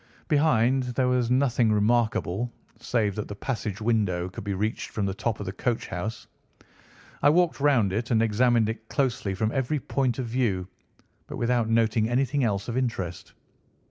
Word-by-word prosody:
Behind 135 -5 +3
there 125 +1 -1
was 125 -2 +1
nothing 125 -3 +2
remarkable, 110 0 +1 0.3
save 115 -3 0
that 105 +1 -4
the 105 - -7
passage 110 -2 -4
window 105 -6 0
could 95 - -8
be 100 -1 -2
reached 105 +4 -2
from 105 - -2
the 95 - -1
top 110 +3 -2
of 105 - -5
the 95 - -3
coach 115 +4 -2
house. 100 +6 -5 1.0
I 145 - +6
walked 175 +1 +2
round 130 -9 +3
it 115 +4 -2
and 115 - +3
examined 115 +1 +3
it 110 0 -6
closely 120 -8 -1
from 110 +3 0
every 135 +3 -1
point 130 -3 -1
of 130 - -2
view, 115 -7 -1 0.6
but - - -6
without 120 -1 +1
noting 115 -1 +2
anything 135 +3 +1
else 100 -4 -1
of 120 - -3
interest. 95 -9 -3
115 Hz, 175 wpm, -26 LUFS, 105-125 Hz, 1.0 s, I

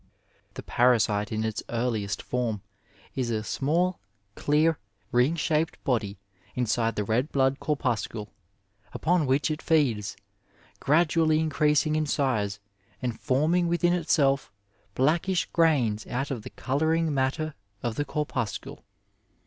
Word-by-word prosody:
The - - -7
parasite 110 -4 +2
in 110 0 -1
its 110 -1 -2
earliest 115 -4 -1
form 115 -5 -2 0.5
is 125 -3 -2
a 110 -2 -1
small, 170 +10 0 0.4
dear, 155 +2 +2 0.3
ring 125 +7 +3
shaped 160 0 0
body 110 -7 -1 0.4
inside 115 -1 0
the 105 - 0
red 120 +8 0
blood 135 0 +2
corpuscle, 115 -7 -2 0.6
upon 170 -3 +1
which 140 +3 +2
it 155 - -3
feeds, 130 - +1 0.6
gradually 155 +1 +3
increasing 155 -1 +2
in 155 -1 0
size 110 -9 0 0.4
and 120 -3 -3
forming 160 +7 +2
within 175 +1 +2
itself 150 -5 +2 0.4
blackish 170 +7 +2
grains 130 -11 +2
out 135 +3 -2
of 125 -5 -3
the - - -8
colouring 160 +4 0
matter 140 +3 0 0.3
of 120 - -1
the 145 - -1
corpuscle. 140 -7 -4
135 Hz, 125 wpm, -27 LUFS, 115-155 Hz, 0.6 s, ring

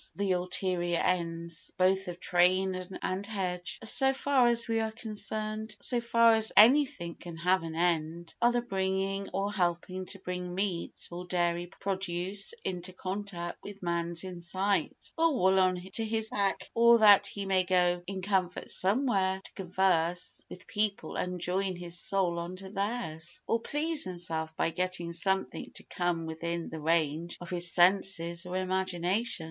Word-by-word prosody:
The 200 -1 0
ulterior 180 -1 0
ends, 170 0 -2
both 190 +1 +2
of 175 0 -6
train 185 +1 +1
and 195 +2 -2
hedge, 180 -4 -3
so 265 +4 +5
far 270 -2 +3
as 235 -1 +4
we 225 -1 +1
are 220 0 0
concerned, 215 -1 -4
and - - -32
so 245 -2 -1
far 230 -1 +5
as 220 0 +3
anything 225 - +5
can 170 -1 -10
have 180 +3 +2
an 165 -1 -6
end, 165 0 -1
are 240 0 +5
the 240 0 0
bringing 195 -2 -2
or 200 +1 -2
helping 185 0 -1
to 195 - -5
bring 180 -1 -5
meat 190 -3 -3
or 175 +1 -7
dairy 175 -1 0
produce 195 - -2
into 180 0 -4
contact 185 -2 -4
with 200 -1 -10
man's 170 0 -1
inside, 185 +2 -1 0.2
or 325 -3 +3
wool 190 -4 +3
on 185 -1 +3 0.2
to 225 - +3
his 220 0 -1
back, 195 -2 -1
or 235 0 +6
that 210 -3 +7
he 200 -1 -2
may 190 -1 +2
go 180 -1 +2
in 190 -1 -5
comfort 185 -2 -1
somewhere 195 -3 +1
to - - -8
converse 180 -2 0
with 185 - -10
people 210 -1 -2
and 180 0 -3
join 185 +2 -1
his 175 0 -5
soul 180 -3 +1
on 170 +2 -5
to 190 0 -7
theirs, 195 -6 -3
or 230 - +1
please 300 +4 0
himself 165 -3 -3
by 165 - 0
getting 180 -1 -2
something 190 +3 -1
to - - -6
come 175 -2 -2
within 170 +1 -4
the 160 - -7
range 160 +1 0
of 175 0 -8
his 175 -1 +2
senses 175 -1 +2
or 180 - -5
imagination. 185 +3 +1
185 Hz, 165 wpm, -30 LUFS, 175-200 Hz, 0.2 s, that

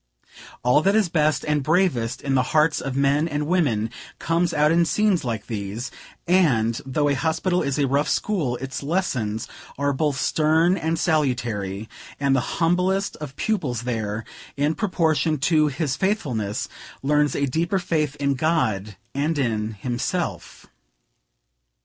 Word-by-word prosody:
All 125 +4 +4
that 195 +5 +2
is 215 -5 +3
best 155 -2 +1
and 150 -1 +1
bravest 150 -7 +1
in 135 - 0
the 130 - +4 0.2
hearts 150 0 +3
of 135 -1 -4
men 140 +3 +2
and 150 -2 -2
women, 135 -11 +1 0.3
comes 170 +1 0
out 150 0 +3
in 170 +1 +4
scenes 200 +2 +2
like 115 -4 -3
these; 110 +2 -5 0.4
and, 125 -11 +3
though 145 +2 +1
a 145 - +2
hospital 165 +5 0
is 140 -1 -1
a 145 - +2
rough 140 +3 +1
school, 165 -13 0
its 130 +1 -5
lessons 135 - -1 0.3
are 140 +1 +1
both 140 -1 0
stern 160 +3 +3
and 165 -2 -1
salutary; 120 - -1 0.3
and 140 -1 +2
the - - +3 0.2
humblest 180 +3 +1
of 145 -3 -8
pupils 145 - -1
there, 110 -3 -3 0.3
in 145 +2 +2
proportion 160 -6 +1
to 155 +2 +3
his 140 -1 -1
faithfulness, 125 - -1 0.4
learns 150 0 +2
a 140 - +1
deeper 165 +8 0
faith 155 -5 -1
in 140 -1 0
God 110 - 0 0.2
and 150 +3 0
in 110 -5 -1
himself. 120 - -3
145 Hz, 150 wpm, -23 LUFS, 125-165 Hz, 0.4 s, All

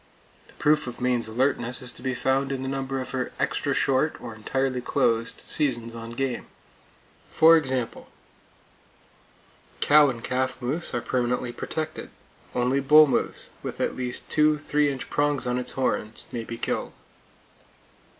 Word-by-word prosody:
The - - -18
proof 150 -2 +2
of 120 - -6
Maine's 125 -2 0
alertness 120 +1 0
is 125 -2 -6
to - - -11
be 130 -1 -2
found 135 +1 +1
in 135 -1 -3
the - - -3
number 135 0 -2
of 130 - -5
her 130 -1 -2
extra - - 0
short, 135 +4 +1
or 120 -2 -7
entirely 130 +4 -1
closed, 115 -3 0
seasons 120 -5 -1
on 115 0 -7
game. 130 0 -2 0.8
For 165 +1 +7
example: 130 -6 -1 1.7
Cow 150 -1 +6
and 115 -3 -5
calf 130 +1 -1
moose 135 +5 -3
are 120 - 0
permanently 125 0 -1
protected. 155 +5 -5 0.5
Only 125 +2 +2
bull 150 +3 +8
moose, 135 - -1
with - - -6
at - - 0
least 125 -1 -4
two 150 0 +3
3 145 0 +1
inch 135 - -6
prongs 145 -2 +1
on 125 0 0
its 125 - -4
horns, 115 -4 -2
may 115 -2 -4
be 115 - -6
killed. - - -3
130 Hz, 155 wpm, -26 LUFS, 120-140 Hz, 1.7 s, bull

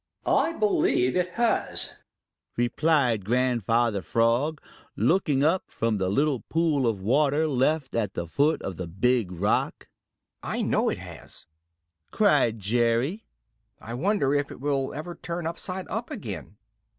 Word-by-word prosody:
"I 330 - +2
believe 200 - +2
it 180 0 0
has," 235 -1 -1 0.6
replied 120 -2 +2
Grandfather 120 -2 +1
Frog, 115 - +1 0.4
looking 155 -6 +2
up 165 +5 +2
from 110 -2 -1
the 95 -1 0
little 140 +5 +1
pool 155 -6 +1
of 105 -4 -1
water 145 +7 +2
left 140 +1 0
at 110 -4 -1
the 85 - -3
foot 145 - +1
of 95 -4 -5
the 90 - -5
Big 105 +3 +1
Rock. 95 +3 -1 0.5
"I - - -2
know - - +1
it - - -2
has!" - - -11 0.6
cried 145 - +3
Jerry. 120 - 0 0.5
"I 115 - -8
wonder 145 - +1
if 145 -1 0
it - - -10
will 135 -1 -1
ever 155 +4 -6
turn 170 -1 -5
upside 185 +3 -4
up 225 +3 -4
again." - - -7
135 Hz, 140 wpm, -26 LUFS, 115-160 Hz, 0.6 s, cried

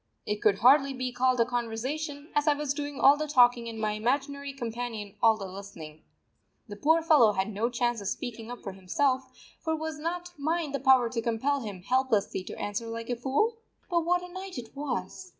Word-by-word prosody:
It 210 0 -2
could 210 -2 +4
hardly 275 +4 +5
be 255 0 -3
called 250 0 +1
a - - +4
conversation, 260 +6 -3
as 295 +1 +1
I 295 - +5
was 290 -1 -1
doing 290 -1 -5
all 280 +1 +7
the 305 +1 -2
talking 245 -4 +4
and 225 - -7
my 215 -1 0
imaginary 275 +6 -1
companion 235 -5 -5
all 225 -1 +5
the 200 - -6
listening. 185 -5 -9 0.7
The 205 - -7
poor 320 +9 +3
fellow 275 -10 +6
had 195 +2 -1
no 220 +4 0
chance 240 -2 -1
of 200 - -5
speaking 230 0 -5
up 245 - -8
for 195 - -5
himself, 255 +8 0 0.3
for 320 -1 -1
was 315 -1 -5
not 350 +3 -4
mine 315 +1 -1
the 280 - -2
power 260 -2 +5
to 235 -2 -1
compel 240 +5 0
him 205 -7 -7
helplessly 230 -5 +1
to - - -7
answer 205 +3 -3
like 230 +1 -5
a - - +1
fool? 280 - 0 0.3
But 340 -1 +2
what 355 +1 +1
a 360 0 -10
night 375 -3 -7
it 235 +1 -8
was! 275 - -4
250 Hz, 205 wpm, -28 LUFS, 225-290 Hz, 0.7 s, all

